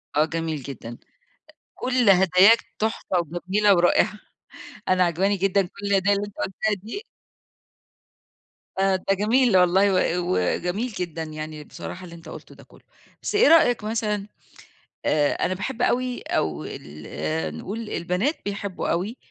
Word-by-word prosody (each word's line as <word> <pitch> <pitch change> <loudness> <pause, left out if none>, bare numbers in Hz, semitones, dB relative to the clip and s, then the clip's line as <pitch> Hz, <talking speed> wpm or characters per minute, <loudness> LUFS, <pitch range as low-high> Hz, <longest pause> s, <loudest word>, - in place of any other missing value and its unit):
آه، 150 +1 +4
جميل 160 -2 -3
جدًا. 120 -3 -8 0.8
كل 250 -4 +2
هداياك 190 +4 +6 0.2
تحفة 220 -3 -1
وجميلة 185 +5 +1
ورائعة. 175 +4 +3 0.7
أنا 185 0 +4
عاجباني 190 +4 +1
جدًا 195 +1 +2
كل 200 +2 -6
الهَدايا 200 0 +3
اللي 200 +1 -2
أنت 205 - -14
قُلتها 210 +2 -1
دي. 400 - -6 1.8
آآ، 195 0 +3
ده 190 +1 0
جميل 220 +2 +3
والله 190 +2 +4 0.3
و - - -2
وجميل 180 - 0
جدًا 170 -5 -4
يعني 155 -1 -7
بصراحة 180 +4 -8
اللي 170 -2 -10
أنت 165 -1 -12
قُلته - - -11
ده - - -15
كله، - - -20 0.4
بس - - -3
إيه 450 +4 +6
رأيك 245 -9 +5
مثلًا 210 -2 -2 0.8
آآ، 145 -1 +2
أنا 185 - 0
باحب 225 +7 -4
أوي 250 0 0
أو 80 - -2
ال 75 +2 -5
نقُول 215 - -6
البنات 180 - -1
بيحبوا 200 -1 -4
أوي 195 +9 -1
190 Hz, 140 wpm, -24 LUFS, 165-210 Hz, 1.8 s, هداياك